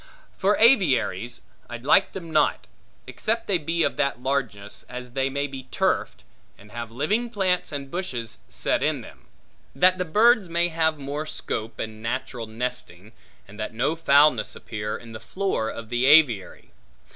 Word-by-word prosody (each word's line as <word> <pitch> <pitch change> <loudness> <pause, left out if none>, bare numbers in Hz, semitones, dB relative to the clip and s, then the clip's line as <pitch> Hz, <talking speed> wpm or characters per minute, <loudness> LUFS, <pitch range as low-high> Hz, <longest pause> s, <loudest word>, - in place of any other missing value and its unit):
For 200 +2 +2
aviaries, 135 - +3 0.3
I 120 - -5
like 150 +10 +3
them 170 -4 -7
not, - - +2 0.4
except 225 +2 -2
they 190 -4 +1
be 165 +2 0
of - - 0
that 140 -3 0
largeness 115 -6 -3
as 125 0 -7
they 135 +1 0
may 140 +1 -1
be 135 -2 -7
turfed, - - -1 0.3
and 105 +1 -17
have 120 -1 -6
living 180 - -1
plants 190 -5 0
and 140 -2 -6
bushes 125 - -4
set - - -1
in - - 0
them; - - -14 0.5
that 185 +1 +4
the - - +1
birds 215 +3 +4
may 170 +1 +1
have 160 -1 +1
more 145 +2 -4
scope, 115 -6 -4
and 110 0 -5
natural 120 0 -4
nesting, 115 -4 -5 0.4
and 105 +2 -14
that 110 +1 -4
no 135 +7 +1
foulness 145 -7 +4
appear 105 -1 -5
in 115 -1 -12
the 110 - -8
floor 190 - -2
of 115 -1 -8
the 120 +2 +1
aviary. 140 -10 +4
135 Hz, 165 wpm, -25 LUFS, 115-170 Hz, 0.5 s, that